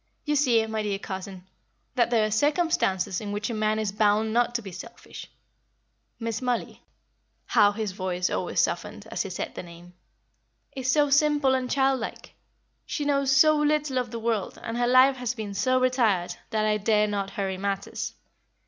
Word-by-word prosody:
"You 295 -1 +1
see, 245 -6 +3
my 220 0 -3
dear 205 -2 -2
cousin, 190 -1 -7 0.5
that 240 -2 +2
there 225 -3 +3
are 215 - -2
circumstances 220 - +1
in 205 -1 -5
which 210 +3 -3
a - - -3
man 215 0 0
is 215 -2 -1
bound 215 +1 +2
not 240 0 +1
to 235 - -1
be 195 - -8
selfish. 180 - -10 0.9
Miss 230 -1 -3
Mollie" 250 -2 -2 0.6
how 205 - +4
his 210 -1 -3
voice 185 -1 -2
always - - -2
softened - - -1
as - - -1
he - - -3
said - - -5
the - - -6
name! 175 0 -13 0.8
"is 260 -1 0
so 290 0 +3
simple 290 -2 +3
and 255 -1 -1
childlike; 265 -3 -1 0.5
she 295 - -3
knows 275 -2 +2
so 310 +2 +6
little 300 -3 +1
of 250 - -3
the 235 - -5
world, 225 -3 -2
and 230 - -4
her 240 0 +1
life 260 +2 +5
has 250 0 -3
been 215 -3 -5
so 255 +6 +2
retired, 230 -9 +1 0.2
that 215 -2 0
I 210 0 +2
dare 210 0 +3
not 200 -2 -2
hurry 190 -2 -3
matters. 200 0 -3
225 Hz, 180 wpm, -26 LUFS, 205-260 Hz, 0.9 s, so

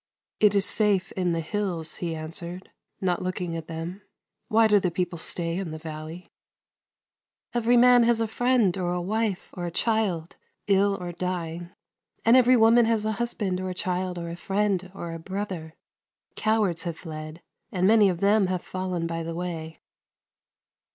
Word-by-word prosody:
" - - -69
It 210 -1 +5
is 200 0 +5
safe 205 -3 +2
in 180 -2 -1
the 165 0 0
hills," 170 -3 -3
he 170 -2 -3
answered, 170 +3 -7 0.3
not 180 -2 0
looking 180 -2 -3
at 165 -1 -6
them. 165 +4 -6 0.2
" - - -55
Why 225 -1 +5
do 210 -1 +5
the 185 - 0
people 175 -1 -3
stay 170 +2 0
in 190 -4 -4
the 155 - -6
valley? 155 +2 -8 0.4
" - - -68
" - - -52
Every 240 0 +3
man 245 0 +7
has 235 -1 +3
a 225 - +1
friend, 235 -3 +2
or 175 -1 -1
a 180 - -1
wife, 205 +1 -2
or 175 -2 -4
a - - -4
child, 195 -5 0 0.3
ill 200 0 +3
or 175 -1 -5
dying, 175 -1 -4 0.6
and 230 +2 +7
every 255 0 +6
woman 230 +1 +6
has 225 -2 +1
a 220 - +1
husband, 200 -6 -1
or 185 - -3
a 180 - -5
child, 180 0 -2
or 170 -1 -5
a 170 - -5
friend, 195 0 -1
or 170 -3 -5
a 165 - -6
brother. 185 -3 -5 0.6
Cowards 210 -6 +1
have 170 -2 -4
fled, 155 0 -8 0.3
and 185 -1 0
many 210 -1 +6
of 175 -2 -3
them 200 0 +4
have 185 -1 -2
fallen 185 -2 -3
by 165 0 -3
the 165 0 -5
way." 165 -2 -5
185 Hz, 185 wpm, -26 LUFS, 170-210 Hz, 0.6 s, man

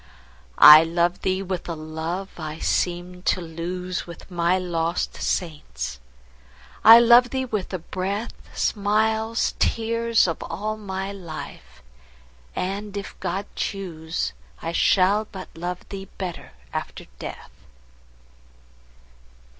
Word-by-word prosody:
I 155 +1 +12
love 170 +2 0
thee 190 0 0
with 185 -2 -4
a 170 - -2
love 160 +5 -5
I 155 -1 -5
seemed 180 +2 -2
to - - +3
lose 175 +2 -4
With 170 +2 -11
my 175 +1 +2
lost 170 -2 -2
saints,—I 65 - +1
love 240 +1 +7
thee 260 0 -2
with 215 -6 -3
the 185 - -3
breath, 190 +6 -4 0.2
Smiles, 220 +2 +1
tears, 230 -1 +2
of 165 - -3
all 210 +6 -3
my 195 -2 -4
life!—and, 65 - -8
if 200 - -6
God 190 +2 -2
choose, 165 -5 -3 0.3
I 165 - -4
shall 195 +5 +3
but 195 -2 -9
love 175 +2 -5
thee 195 -1 -6
better 180 -3 -6 0.2
after - - -5
death. - - -8
180 Hz, 110 wpm, -24 LUFS, 160-200 Hz, 0.3 s, I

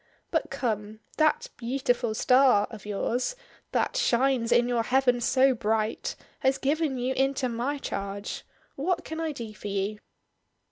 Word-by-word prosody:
But - - 0
come; 215 -3 -3 0.2
that 315 +11 +2
'Beautiful 245 -2 0
Star' 250 -4 +5
of 210 -3 -10
yours, 240 - -1 0.4
that - - 0
'shines 250 - +2
in 240 0 +4
your 240 -1 +1
heaven 250 0 +2
so 265 +2 +4
bright,' 220 -1 -1 0.2
has 265 0 +2
given 290 0 0
you 250 +1 0
into 270 0 +1
my 245 +5 -2
charge. 200 -5 -4 0.3
What 345 +4 -1
can 320 0 -5
I 325 -1 -1
do 230 -6 -7
for 210 - -8
you?" 200 +1 -2
245 Hz, 145 wpm, -27 LUFS, 220-275 Hz, 0.4 s, Star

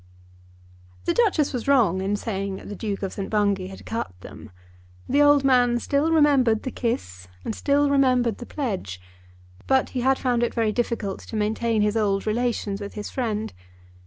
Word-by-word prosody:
The 340 - +1
Duchess 365 -12 +2
was 245 -1 -4
wrong 220 -10 +3
in 195 +2 0
saying 195 -2 -3
that - - -10
the 205 - -5
Duke 200 -1 -4
of 190 - -3
St. 195 - -5
Bungay 200 -3 +1
had 190 0 -11
cut 160 - -5
them. - - -11 0.6
The 285 +3 +3
old 290 -1 +5
man 245 -3 +4
still 285 +5 0
remembered 275 -8 +3
the 260 - -4
kiss 90 - -3 0.2
and 225 - -2
still 285 +5 +2
remembered 255 -5 +2
the 240 - -8
pledge. 190 - -4 0.7
But 265 -1 +2
he 255 - -3
had 265 +2 +3
found 245 -2 0
it 240 - -1
very 225 -2 +1
difficult 225 -4 -2
to - - -9
maintain 220 +1 0
his 210 +1 +1
old 200 -3 +1
relations 220 -3 -1
with 200 - -7
his 210 -1 -6
friend. 220 - -2
230 Hz, 180 wpm, -24 LUFS, 200-260 Hz, 0.7 s, old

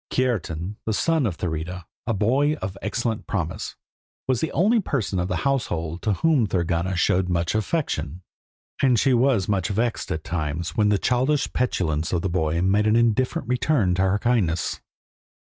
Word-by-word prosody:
Kiartan, 105 -7 -1
the 110 - +1
son 160 -3 +2
of 90 - -4
Thurida, 90 +1 -4 0.2
a 115 - +1
boy 130 +9 +2
of 95 -11 -5
excellent 115 +1 -2
promise, 85 -4 -3 0.5
was 130 -3 +1
the 160 - -1
only 220 +7 +3
person 120 - -1
of 90 - -1
the 90 - -1
household 85 - -1
to 105 - +1
whom 145 - +2
Thorgunna 85 0 0
showed 90 +1 +2
much 85 -1 0
affection; 95 - -2 0.6
and 125 -4 +4
she 135 - +3
was 120 -6 +3
much 95 -4 0
vexed 110 0 -1
at 80 -4 -3
times 80 0 -3
when 105 -1 +3
the 105 - +3
childish 130 +6 +1
petulance 85 -10 0
of 85 -2 0
the 95 - 0
boy 85 -1 0
made 100 +3 +3
an 110 - +4
indifferent 120 +5 +1
return 125 -6 +2
to 90 - 0
her 95 +1 +2
kindness. 105 -8 0
105 Hz, 170 wpm, -24 LUFS, 90-125 Hz, 0.6 s, and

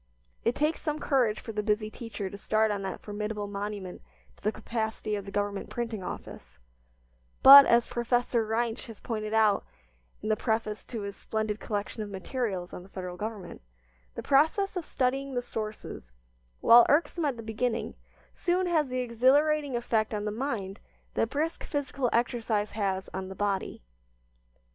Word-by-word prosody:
It 235 - +1
takes 305 +2 0
some 300 -2 -1
courage 250 -8 +1
for 225 - -7
the 210 -1 -1
busy 215 0 0
teacher 225 -4 -6
to 190 - -7
start 215 +2 +1
on 200 -1 -2
that 190 -1 -5
formidable 210 0 -4
monument 200 -2 -5 0.3
to - - -25
the 215 - +2
capacity 220 -1 -3
of 200 -2 -5
the 200 - -8
Government 205 0 -2
Printing 230 -4 -3
Office, 60 - -8 0.9
but, 275 +1 +12
as 235 0 +5
Professor 240 0 0
Reinsch 225 +1 -2
has 225 -2 -10
pointed 215 -2 -4
out 220 -2 +3 0.6
in 215 - -2
the 215 - +4
preface 220 -1 -1
to 230 -3 -5
his 200 0 -5
splendid 215 0 -3
collection 210 +1 -3
of 210 - -5
materials 195 -2 -3
on - - -6
the 185 - -15
Federal 180 -2 -6
Government, 205 -2 -6 0.5
the - - -5
process 320 +9 +3
of 355 -3 -4
studying 270 +1 -1
the 245 - +1
sources 215 - -6 0.5
while 235 +1 +9
irksome 325 +2 +2
at 275 -4 0
the 230 - -7
beginning 220 +2 -2 0.4
soon 365 +1 0
has 320 -5 +2
the 255 0 -2
exhilarating 275 +4 +3
effect 220 -2 0
on 205 0 -3
the 210 - -1
mind 215 -5 -3 0.3
that 225 - +1
brisk 315 +5 -2
physical 275 -3 -1
exercise 225 -3 0
has 195 -3 -1
on 190 0 -4
the 190 - -7
body. 200 - -2
220 Hz, 165 wpm, -29 LUFS, 205-250 Hz, 0.9 s, but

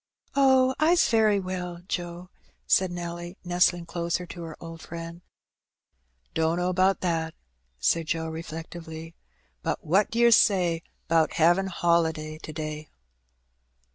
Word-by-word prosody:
"Oh, 265 -1 +5
I's 335 +3 +4
very 215 -3 +4
well, 180 -2 -5
Joe," 175 0 -5 0.3
said 185 -1 +3
Nelly, 175 +1 -6
nestling 175 -1 +2
closer 170 +1 -2
to 175 0 -9
her 165 -2 -7
old 165 -1 -9
friend. 170 +1 -8 1.1
"Dunno 170 +3 +1
'bout 190 +1 +2
that," 165 -2 -1 0.4
said 165 - +1
Joe, 165 0 -1
reflectively; 160 0 -7 0.5
"but - - -3
what 190 +7 +3
d'yer 235 +1 +4
say 180 -7 +4 0.3
'bout 160 -1 +3
havin' 175 +4 +3
holiday 160 -3 0
to 155 - -8
day?" 155 -1 -6
170 Hz, 120 wpm, -26 LUFS, 165-185 Hz, 1.1 s, Oh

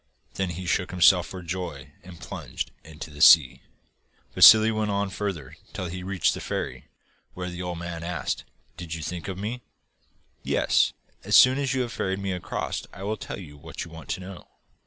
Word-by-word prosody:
Then 95 -1 -2
he 90 +2 -6
shook 90 0 0
himself 90 0 +5
for 95 -1 -8
joy, 85 -5 -6
and 90 -2 -13
plunged - - -6
into 75 0 -10
the 75 0 -9
sea. 70 -6 +7 0.7
Vassili 110 0 +8
went 110 -1 -1
on 100 -1 -1
further 95 -9 -4 0.2
till 95 - -4
he 90 +1 -6
reached 95 -1 0
the - - -6
ferry, - - -4 0.5
where 90 0 -5
the 90 0 -6
old 90 -1 -4
man 85 -1 -6
asked: 90 0 -3 0.3
'Did 85 -2 -6
you 80 - -6
think 90 +3 -5
of 95 -2 -5
me?' 110 +5 -4 0.8
'Yes, - - +2 0.3
and - - -17
as - - +3
soon 130 +2 +7
as 135 -1 -1
you 130 - +1
have 120 -2 -3
ferried 95 0 -2
me 100 -1 -3
across 90 -3 -3
I 95 - -10
will 105 +2 -1
tell - - -7
you 75 -7 -11
what - - -7
you 85 - -13
want 80 -1 -11
to 95 - -3
know. 90 0 -10
90 Hz, 200 wpm, -26 LUFS, 85-100 Hz, 0.8 s, Vassili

